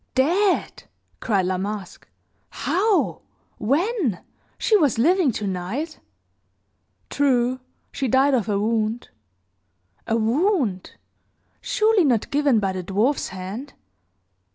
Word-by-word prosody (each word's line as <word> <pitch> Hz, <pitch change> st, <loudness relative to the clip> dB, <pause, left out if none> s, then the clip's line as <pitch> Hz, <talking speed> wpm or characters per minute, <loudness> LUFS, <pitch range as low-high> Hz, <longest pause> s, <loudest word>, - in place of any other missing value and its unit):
"Dead!" 355 Hz, +9 st, +1 dB, 0.3 s
cried 200 Hz, -6 st, 0 dB
La 185 Hz, 0 st, -1 dB
Masque. 200 Hz, -1 st, -6 dB, 0.4 s
"How? 400 Hz, +3 st, 0 dB, 0.4 s
When? 290 Hz, -, 0 dB, 0.4 s
She 440 Hz, -, +2 dB
was 295 Hz, -, +3 dB
living, 330 Hz, +4 st, +3 dB
tonight!" 210 Hz, -, -4 dB, 1.1 s
"True! 255 Hz, -3 st, +1 dB, 0.3 s
She 270 Hz, -, -2 dB
died 265 Hz, +3 st, +3 dB
of 230 Hz, -5 st, 0 dB
a 205 Hz, -, +1 dB
wound." 220 Hz, +2 st, -1 dB, 1.0 s
"A 225 Hz, -, +1 dB
wound? 235 Hz, -, 0 dB, 0.7 s
Surely 430 Hz, -3 st, +2 dB
not 245 Hz, -7 st, +1 dB
given 280 Hz, -5 st, +3 dB
by 195 Hz, -2 st, 0 dB
the 185 Hz, 0 st, -4 dB
dwarfs 210 Hz, +10 st, 0 dB
hand?" 190 Hz, +9 st, -7 dB
250 Hz, 105 wpm, -23 LUFS, 205-310 Hz, 1.1 s, was